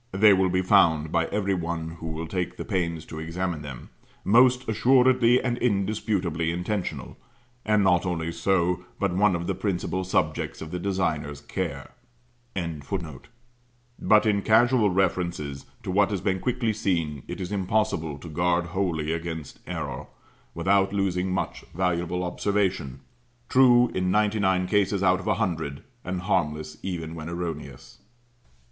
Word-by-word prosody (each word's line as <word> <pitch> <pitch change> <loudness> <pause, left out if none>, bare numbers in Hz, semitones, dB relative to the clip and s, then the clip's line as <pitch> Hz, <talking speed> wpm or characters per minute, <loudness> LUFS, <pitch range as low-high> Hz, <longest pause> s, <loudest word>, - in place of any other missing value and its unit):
They 100 +2 +6
will 95 -1 +3
be 95 +1 +1
found, 80 -6 +4
by 85 -1 +1
every 100 -1 0
one 85 -2 -3
who 80 - -6
will 80 +1 -4
take 90 0 -3
the - - -5
pains 85 -6 -2
to 80 - -8
examine 85 0 -3
them, 70 -4 -9 0.3
most 125 +4 +4
assuredly 125 +2 +4
and 120 -1 -2
indisputably 100 -6 0
intentional, 90 +3 -3 0.5
and 105 -1 +3
not 90 -2 +3
only 85 -2 -2
so, 90 +1 +1 0.2
but 100 -3 0
one 100 -1 +3
of 85 0 -3
the - - -1
principal 95 -2 -2
subjects 80 -4 -1
of 80 - -7
the 90 - -3
designer's 80 -7 -1
care.] 70 - -4 2.1
but 105 0 +4
in 100 -2 +2
casual 115 +1 +4
references 85 -6 -1 0.2
to - - -3
what 100 +2 +3
has 100 -2 -2
been 95 0 0
quickly 115 0 0
seen, 85 -9 -1
it - - -6
is 95 +1 -5
impossible 95 -6 0
to 80 - -11
guard 85 +2 +1
wholly 85 -6 -1
against 80 -3 -5
error, 80 -8 -5 0.5
without 95 +3 +2
losing 95 -2 0
much 95 - -3
valuable 90 -1 0
observation, 90 -7 -1 0.5
true 125 -2 +6
in 90 0 0
ninety 105 +2 +2
nine 95 -2 +2
cases 100 0 +1
out 95 0 +4
of 95 - -8
a - - +2
hundred, 80 -9 -2 0.2
and 90 0 -3
harmless 75 -4 -1
even 85 -4 -4
when 80 0 -6
erroneous. 80 -7 -6
90 Hz, 150 wpm, -26 LUFS, 80-100 Hz, 2.1 s, They